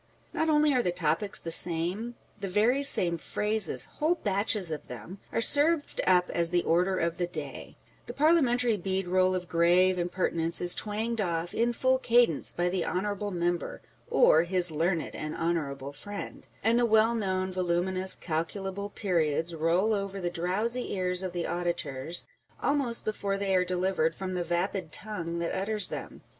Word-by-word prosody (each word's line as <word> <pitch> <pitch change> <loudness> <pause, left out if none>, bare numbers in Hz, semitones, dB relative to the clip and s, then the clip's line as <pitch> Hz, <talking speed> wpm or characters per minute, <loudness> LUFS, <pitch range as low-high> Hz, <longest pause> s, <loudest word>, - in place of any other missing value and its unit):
Not 320 - 0
only 300 -1 +3
are 250 - +2
the 180 - -1
topics 175 +4 +1
the 165 - -3
same; 180 +9 +3 0.2
the 200 - -4
very 220 +8 +2
same 175 -11 +3
phrases 210 +3 -1
â€" - - -22
whole 315 +4 +1
batches 200 - 0
of 155 - -6
them, 125 - -10
â€" - - -4
are - - +2
served 290 +4 +2
up 180 -1 +3
as 170 -1 0
the 175 0 +1
Order 180 +3 +1
of 170 -1 -1
the 175 - 0
Day; 175 - -8 0.3
the - - -6
same - - -26
parliamentary 250 -7 +2
bead 190 0 -2
roll 185 +1 +2
of 180 -1 -4
grave 180 +2 +3
imper 180 +1 -2
tinence 165 0 +1
is 175 0 +3
twanged 220 +2 -2
off, 170 -2 -2
in 235 +1 +1
full 260 +2 +1
cadence, 240 - +3
by 175 0 -1
the 180 -1 -1
Honourable 205 +3 -3
Member 175 -2 -3 0.3
or 160 - +5
his 175 0 +6
Learned 165 +2 -1
and 155 0 -6
Honourable 145 -5 -3
Friend; 205 +8 -8 0.2
and 230 +3 +3
the 240 - +3
well 220 +1 +3
known, 190 -4 -2
voluminous, 185 +1 +1
calculable 190 +5 -4
periods 170 -5 -1
roll 170 +7 +1
over 200 -1 -3
the 175 -2 -3
drowsy 210 +9 -1
ears 180 -1 0
of 185 -1 -4
the 175 -1 -4
auditors, 170 -3 -2 0.3
almost 275 -5 -1
before 200 -2 -2
they 195 -1 -1
are 180 - +3
delivered 180 -3 -1
from 190 -1 -5
the 180 - -2
vapid 175 0 -3
tongue 170 -5 -4
that 170 0 -3
utters 205 +2 +2
them - - -8
185 Hz, 175 wpm, -28 LUFS, 170-210 Hz, 0.3 s, his